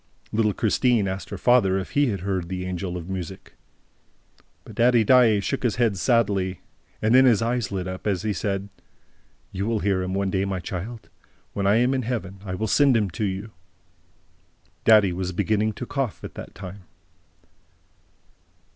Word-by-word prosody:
Little 105 Hz, -2 st, +1 dB
Christine 115 Hz, -1 st, +2 dB
asked 95 Hz, -1 st, -5 dB
her -, -, -5 dB
father 115 Hz, -7 st, +3 dB
if 95 Hz, -, -5 dB
he 145 Hz, 0 st, +2 dB
had 100 Hz, -6 st, -2 dB
heard 95 Hz, -3 st, -2 dB
the 90 Hz, -1 st, -4 dB
Angel 90 Hz, 0 st, -4 dB
of 85 Hz, -1 st, -8 dB
Music. 95 Hz, -1 st, -6 dB, 1.1 s
But -, -, -12 dB
Daddy 120 Hz, -1 st, +4 dB
Daae 115 Hz, -3 st, +5 dB
shook 135 Hz, +7 st, -2 dB
his 120 Hz, -4 st, 0 dB
head 115 Hz, -4 st, +1 dB
sadly; 100 Hz, -4 st, +1 dB, 0.4 s
and 110 Hz, +2 st, +3 dB
then 130 Hz, +1 st, +7 dB
his 115 Hz, -3 st, +4 dB
eyes 120 Hz, -2 st, -1 dB
lit 95 Hz, -2 st, -3 dB
up, 95 Hz, +3 st, -6 dB
as 95 Hz, -4 st, 0 dB
he 110 Hz, -1 st, 0 dB
said: 100 Hz, +1 st, -3 dB, 0.8 s
"You 95 Hz, +2 st, -3 dB
will 115 Hz, -2 st, 0 dB
hear 95 Hz, -2 st, +1 dB
him 90 Hz, +1 st, -3 dB
one 100 Hz, -1 st, 0 dB
day, 95 Hz, 0 st, 0 dB
my 95 Hz, -1 st, -2 dB
child! 100 Hz, +6 st, -6 dB, 0.4 s
When 100 Hz, -1 st, -1 dB
I 100 Hz, -, +4 dB
am 125 Hz, +3 st, +3 dB
in 130 Hz, -, 0 dB
Heaven, 110 Hz, -6 st, -4 dB
I 95 Hz, -2 st, -4 dB
will 110 Hz, -, -2 dB
send 135 Hz, +3 st, +4 dB
him 105 Hz, -4 st, 0 dB
to 105 Hz, -, -2 dB
you!" 100 Hz, +3 st, -4 dB, 1.3 s
Daddy 105 Hz, -5 st, +6 dB
was 95 Hz, +1 st, -3 dB
beginning 110 Hz, +4 st, 0 dB
to 125 Hz, -, -6 dB
cough 130 Hz, -11 st, -3 dB
at -, -, -7 dB
that -, -, -10 dB
time. 95 Hz, 0 st, -9 dB
100 Hz, 180 wpm, -24 LUFS, 95-115 Hz, 1.3 s, then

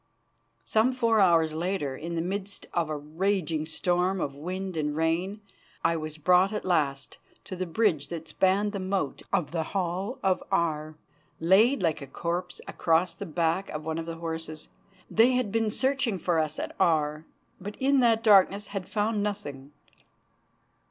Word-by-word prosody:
Some 220 Hz, -, +2 dB
four 230 Hz, -3 st, +2 dB
hours 165 Hz, -5 st, +4 dB
later, 165 Hz, -4 st, -2 dB
in 170 Hz, +4 st, -5 dB
the 165 Hz, -, -1 dB
midst 195 Hz, +2 st, -4 dB
of 170 Hz, -3 st, 0 dB
a 155 Hz, -, -2 dB
raging 160 Hz, +1 st, -1 dB
storm 180 Hz, +3 st, 0 dB
of 140 Hz, -4 st, -2 dB
wind 185 Hz, +5 st, -5 dB
and 150 Hz, -2 st, -1 dB
rain, 170 Hz, +6 st, 0 dB, 0.4 s
I 165 Hz, -, +3 dB
was 155 Hz, -1 st, -5 dB
brought 180 Hz, +5 st, +4 dB
at 210 Hz, -, -4 dB
last 145 Hz, -7 st, 0 dB, 0.2 s
to 190 Hz, -, -7 dB
the 185 Hz, 0 st, -3 dB
bridge 170 Hz, -5 st, +1 dB
that 165 Hz, -1 st, -6 dB
spanned 195 Hz, +5 st, +2 dB
the 200 Hz, -, -4 dB
moat 185 Hz, -6 st, -2 dB
of 175 Hz, -6 st, 0 dB
the 165 Hz, -1 st, -1 dB
Hall 190 Hz, -, -2 dB
of 190 Hz, -1 st, +2 dB
Aar, 155 Hz, -4 st, 0 dB, 0.4 s
laid 195 Hz, +8 st, +4 dB
like 160 Hz, -4 st, +1 dB
a 140 Hz, -, -7 dB
corpse 175 Hz, +5 st, -4 dB
across 165 Hz, +1 st, +1 dB
the 200 Hz, -, -7 dB
back 165 Hz, +3 st, 0 dB
of 150 Hz, 0 st, -6 dB
one 160 Hz, 0 st, -2 dB
of 165 Hz, -, -6 dB
the 165 Hz, -, -4 dB
horses. 160 Hz, -1 st, -5 dB, 0.4 s
They 235 Hz, +4 st, +4 dB
had 250 Hz, -5 st, 0 dB
been 225 Hz, 0 st, +1 dB
searching 260 Hz, -2 st, 0 dB
for 170 Hz, -1 st, +1 dB
us 155 Hz, -1 st, -1 dB
at -, -, -5 dB
Aar, 155 Hz, -2 st, +2 dB, 0.4 s
but 205 Hz, +2 st, -7 dB
in 275 Hz, +1 st, +2 dB
that 230 Hz, -2 st, +3 dB
darkness 200 Hz, -1 st, +5 dB
had 195 Hz, -3 st, -5 dB
found 215 Hz, 0 st, 0 dB
nothing. 145 Hz, -10 st, -5 dB
180 Hz, 170 wpm, -27 LUFS, 160-200 Hz, 0.4 s, darkness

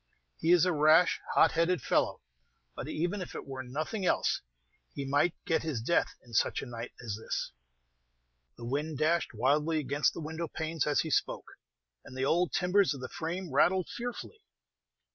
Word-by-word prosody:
"He 165 Hz, -, +2 dB
is 175 Hz, -1 st, +6 dB
a 180 Hz, -, +2 dB
rash, 155 Hz, +3 st, +5 dB, 0.2 s
hot 160 Hz, -, +6 dB
headed 170 Hz, +1 st, +2 dB
fellow; -, -, 0 dB, 0.5 s
but -, -, -6 dB
even 175 Hz, +5 st, -2 dB
if 180 Hz, -, -7 dB
it -, -, -6 dB
were 135 Hz, -1 st, -6 dB
nothing 155 Hz, -, -4 dB
else, 180 Hz, -, +1 dB, 0.5 s
he 140 Hz, -, -3 dB
might 145 Hz, +5 st, +2 dB
get 160 Hz, -, +1 dB
his 155 Hz, -7 st, -2 dB
death 125 Hz, +10 st, +1 dB
in 120 Hz, -, -16 dB
such -, -, +1 dB
a -, -, -6 dB
night 120 Hz, -1 st, -7 dB
as 110 Hz, -4 st, -3 dB
this." 110 Hz, -, -4 dB, 1.1 s
The 120 Hz, -, -8 dB
wind 145 Hz, +4 st, -2 dB
dashed 155 Hz, -3 st, +1 dB
wildly 150 Hz, +7 st, +2 dB
against 145 Hz, 0 st, +1 dB
the -, -, -5 dB
window 160 Hz, +1 st, -4 dB
panes 160 Hz, -1 st, -2 dB
as 145 Hz, -, +3 dB
he 160 Hz, -, -4 dB
spoke, -, -, -1 dB, 0.5 s
and 130 Hz, -, -11 dB
the 130 Hz, -, 0 dB
old 175 Hz, +5 st, +2 dB
timbers 180 Hz, -2 st, +2 dB
of -, -, -8 dB
the 130 Hz, -, -5 dB
frame 175 Hz, +3 st, -4 dB
rattled 185 Hz, 0 st, +3 dB
fearfully. 245 Hz, -, -6 dB
160 Hz, 180 wpm, -30 LUFS, 135-175 Hz, 1.1 s, is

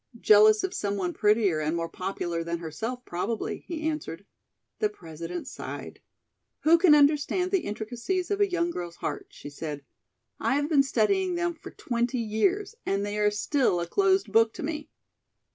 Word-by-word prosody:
"Jealous 215 Hz, 0 st, +6 dB
of 380 Hz, -, -2 dB
some 200 Hz, -1 st, -2 dB
one 180 Hz, -3 st, -2 dB
prettier 210 Hz, -6 st, +2 dB
and 155 Hz, +2 st, -1 dB
more 165 Hz, 0 st, -2 dB
popular 175 Hz, -2 st, -3 dB
than 170 Hz, +1 st, -3 dB
herself, 225 Hz, +10 st, -5 dB
probably," 200 Hz, +6 st, -3 dB
he 320 Hz, -2 st, -3 dB
answered. 295 Hz, -, -4 dB, 0.5 s
The 425 Hz, -, +2 dB
President 170 Hz, -, -7 dB
sighed. -, -, -7 dB, 0.6 s
"Who 330 Hz, +2 st, +5 dB
can 330 Hz, -4 st, +7 dB
understand 300 Hz, +5 st, +3 dB
the 390 Hz, -, +3 dB
intricacies 245 Hz, -, -3 dB
of 405 Hz, 0 st, 0 dB
a 405 Hz, -, +4 dB
young 345 Hz, -1 st, 0 dB
girl's 175 Hz, -, -6 dB
heart," -, -, -4 dB
she 145 Hz, -, -10 dB
said. 145 Hz, -1 st, -6 dB, 0.6 s
"I -, -, +1 dB
have 290 Hz, +1 st, 0 dB
been 295 Hz, -4 st, +5 dB
studying 350 Hz, -, +1 dB
them 345 Hz, 0 st, 0 dB
for 315 Hz, -, -11 dB
twenty 240 Hz, +1 st, -2 dB
years, 350 Hz, -, 0 dB
and 200 Hz, +1 st, -1 dB
they 205 Hz, +1 st, -3 dB
are 210 Hz, 0 st, +4 dB
still 210 Hz, -1 st, +1 dB
a 170 Hz, -, -1 dB
closed 380 Hz, -, +2 dB
book 225 Hz, +1 st, +4 dB
to -, -, -6 dB
me." 300 Hz, 0 st, -4 dB
230 Hz, 175 wpm, -27 LUFS, -, 0.6 s, can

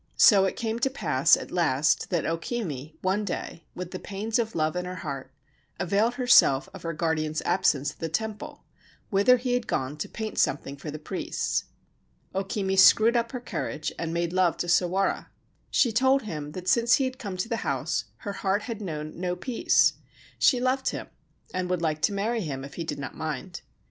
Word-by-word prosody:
So 195 Hz, -4 st, +7 dB
it 190 Hz, -, -1 dB
came 225 Hz, 0 st, -2 dB
to 270 Hz, -, +2 dB
pass 165 Hz, -, +3 dB
at -, -, -8 dB
last 150 Hz, -4 st, +2 dB
that 175 Hz, -4 st, 0 dB
O 165 Hz, -, +1 dB
Kimi 160 Hz, -, -5 dB
one 190 Hz, +3 st, +1 dB
day, 175 Hz, -3 st, -5 dB
with 180 Hz, -1 st, -6 dB
the 185 Hz, -, -5 dB
pains 215 Hz, +4 st, -2 dB
of 225 Hz, -1 st, -2 dB
love 155 Hz, +1 st, 0 dB
in 180 Hz, 0 st, -2 dB
her 180 Hz, 0 st, -5 dB
heart, 135 Hz, -2 st, -5 dB, 0.5 s
availed 200 Hz, +6 st, +1 dB
herself 245 Hz, -, +5 dB
of -, -, -9 dB
her 165 Hz, -, -3 dB
guardian's 155 Hz, -1 st, -1 dB
absence 145 Hz, -6 st, +2 dB
at -, -, -20 dB
the 165 Hz, -, -3 dB
temple, 215 Hz, +5 st, -4 dB, 0.5 s
whither 200 Hz, +6 st, +5 dB
he 250 Hz, 0 st, -2 dB
had 245 Hz, -1 st, -1 dB
gone 130 Hz, +3 st, -2 dB
to 150 Hz, -, -4 dB
paint 220 Hz, -1 st, -4 dB
something 140 Hz, 0 st, 0 dB
for 140 Hz, +2 st, -8 dB
the 150 Hz, -, -5 dB
priests. 150 Hz, -, -2 dB, 0.7 s
O 195 Hz, -, 0 dB
Kimi 195 Hz, 0 st, -1 dB
screwed 220 Hz, +5 st, +7 dB
up 235 Hz, -1 st, +1 dB
her 250 Hz, -, -4 dB
courage 155 Hz, -10 st, -4 dB
and 165 Hz, -1 st, -2 dB
made 170 Hz, 0 st, -1 dB
love 185 Hz, -2 st, +2 dB
to 175 Hz, -, -2 dB
Sawara. 180 Hz, +2 st, +1 dB, 0.4 s
She 240 Hz, -, +3 dB
told 265 Hz, +4 st, +3 dB
him 150 Hz, -7 st, -6 dB
that 180 Hz, 0 st, -7 dB
since 235 Hz, +3 st, +5 dB
he 275 Hz, -, +1 dB
had 255 Hz, 0 st, -4 dB
come 200 Hz, -6 st, -5 dB
to 185 Hz, -, -2 dB
the 230 Hz, -1 st, -1 dB
house 135 Hz, -, -1 dB, 0.2 s
her 200 Hz, -, -3 dB
heart 200 Hz, +1 st, 0 dB
had 230 Hz, -3 st, -5 dB
known 155 Hz, -4 st, -5 dB
no 180 Hz, 0 st, -1 dB
peace. 230 Hz, +6 st, +3 dB, 0.5 s
She 255 Hz, -, +5 dB
loved 260 Hz, +1 st, +1 dB
him, -, -, -6 dB, 0.4 s
and 185 Hz, -1 st, -2 dB
would 180 Hz, -2 st, -1 dB
like 155 Hz, -1 st, 0 dB
to -, -, +3 dB
marry 220 Hz, +4 st, -1 dB
him 135 Hz, -6 st, -4 dB
if 140 Hz, -, -11 dB
he 170 Hz, -, -4 dB
did 160 Hz, -, -4 dB
not 140 Hz, -, -6 dB
mind. 160 Hz, +3 st, -5 dB
185 Hz, 205 wpm, -27 LUFS, 155-225 Hz, 0.7 s, So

